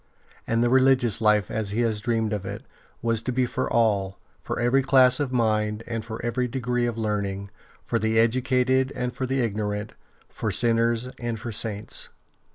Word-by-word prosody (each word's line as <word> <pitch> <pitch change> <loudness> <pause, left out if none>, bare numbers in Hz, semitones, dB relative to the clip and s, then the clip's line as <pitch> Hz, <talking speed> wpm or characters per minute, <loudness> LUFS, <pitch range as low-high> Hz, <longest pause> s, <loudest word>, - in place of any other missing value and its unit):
And 115 +1 +2
the 120 - +2
religious 130 -4 +3
life, 105 -2 +3
as 110 -2 -2
he 110 +4 -1
had 115 -2 +2
dreamed 115 -1 0
of 105 -2 -3
it, 100 +5 -6 0.4
was 115 -1 +1
to 125 - -3
be 125 +1 +1
for 130 +1 -3
all, 100 -4 +1 0.2
for - - -4
every 120 +3 +3
class 130 -2 +5
of 140 -3 -1
mind 110 -3 0
and 115 -1 -4
for 110 0 -7
every 125 +1 0
degree 125 -1 -1
of 115 -1 -3
learning, 100 -2 -2 0.3
for 115 - 0
the 110 +1 0
educated 130 +3 +2
and 125 0 -2
for 130 - -3
the 135 +1 0
ignorant, 105 -2 -2 0.3
for - - -4
sinners 115 +1 +1
and 120 -2 -3
for 115 +2 -5
Saints. 110 -1 -3
115 Hz, 180 wpm, -25 LUFS, 110-125 Hz, 0.4 s, class